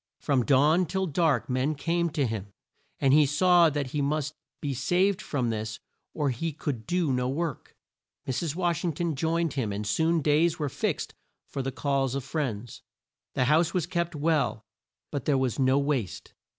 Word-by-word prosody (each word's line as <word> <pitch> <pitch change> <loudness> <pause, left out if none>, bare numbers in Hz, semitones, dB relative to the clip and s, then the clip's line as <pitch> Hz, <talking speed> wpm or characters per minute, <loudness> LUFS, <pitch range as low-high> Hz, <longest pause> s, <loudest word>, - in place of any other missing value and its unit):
From 135 -4 +1
dawn 150 +6 +4
till 190 +3 -1
dark 155 - +1
men 130 +4 0
came 170 +4 0
to 150 -3 0
him, 105 -4 -4 0.5
and 135 -1 +3
he 150 -1 +6
saw 175 +3 +5
that 145 -3 -3
he 150 - -1
must 150 +1 -1 0.3
be 145 -2 -2
saved 180 +9 +1
from 125 -5 -1
this 110 0 -4 0.4
or 145 -3 +1
he 155 +6 -3
could 135 -7 -4
do 175 -6 +1
no 125 0 0
work. 155 0 -4 0.5
Mrs. 140 +4 -2
Wash 175 -2 0
ing 170 -3 0
ton 170 +2 -1
joined 165 +1 0
him 125 -7 -1
and 105 +1 -3
soon 160 +9 +1
days 155 +3 +3
were 150 -3 -2
fixed - - -2 0.3
for 135 - -4
the 135 0 -3
calls 135 -2 0
of 140 - -2
friends. 120 -6 -4 0.5
The 125 - +2
house 160 +5 +3
was 175 -4 +1
kept 170 -2 -2
well, 145 -8 0 0.5
but 140 -4 -3
there 145 -3 +3
was 130 -2 -1
no 130 0 +4
waste. 140 -8 -2
145 Hz, 180 wpm, -27 LUFS, 130-165 Hz, 0.5 s, he